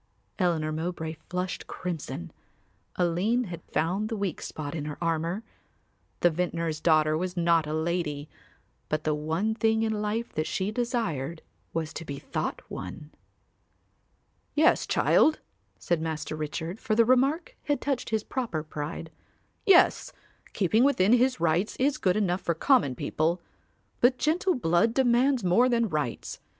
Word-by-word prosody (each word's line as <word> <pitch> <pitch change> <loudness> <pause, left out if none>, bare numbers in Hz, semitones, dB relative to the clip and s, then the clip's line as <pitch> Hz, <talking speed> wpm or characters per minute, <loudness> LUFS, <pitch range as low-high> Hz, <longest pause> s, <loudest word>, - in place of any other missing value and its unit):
Eleanor 165 -4 +1
Mowbray 160 0 -3 0.2
flushed 180 +1 -3
crimson; 155 - -5 0.6
Aline 185 +8 +1
had 175 -6 -7
found 185 +7 0
the 225 - -3
weak 195 -5 -2
spot 145 -2 -5
in 155 -3 -4
her 150 -1 -5
armour. 170 +4 -1 0.8
The 175 - +5
vintner's 165 -2 -2
daughter 155 -2 +4
was 180 +2 -3
not 170 -2 +3
a 150 - -3
lady, 160 -3 -2 0.6
but 155 0 -1
the 155 - +1
one 160 +8 -1
thing 220 0 +2
in 220 -1 0
life 215 +3 -2
that 155 0 -1
she 190 +2 -1
desired 195 - -2 0.3
was 160 -1 -3
to - - -6
be 140 -3 -6
thought - - -4
one. 150 +12 -7 1.4
"Yes, 310 +2 +4
child," 310 0 +4 0.4
said 170 -2 -1
Master 155 -1 -3
Richard, 160 +5 -4
for 215 - 0
the 230 +1 +5
remark 275 - +2
had 290 -1 +1
touched 275 -3 -2
his 220 -2 0
proper 225 - -3
pride. 155 +1 -6 0.6
"Yes, 375 -3 +5 0.4
keeping 215 +5 +3
within 240 -7 +4
his 250 -3 +3
rights 170 +5 +1
is 275 +2 +1
good 185 +1 +2
enough 185 -3 +1
for 170 - -1
common 190 - +3
people. 165 +7 0 0.6
But 250 +1 +4
gentle 350 +6 +1
blood 220 +1 +2
demands 255 -1 +3
more 185 +8 +4
than 235 -2 +2
rights. 150 -7 -3
175 Hz, 145 wpm, -27 LUFS, 160-230 Hz, 1.4 s, The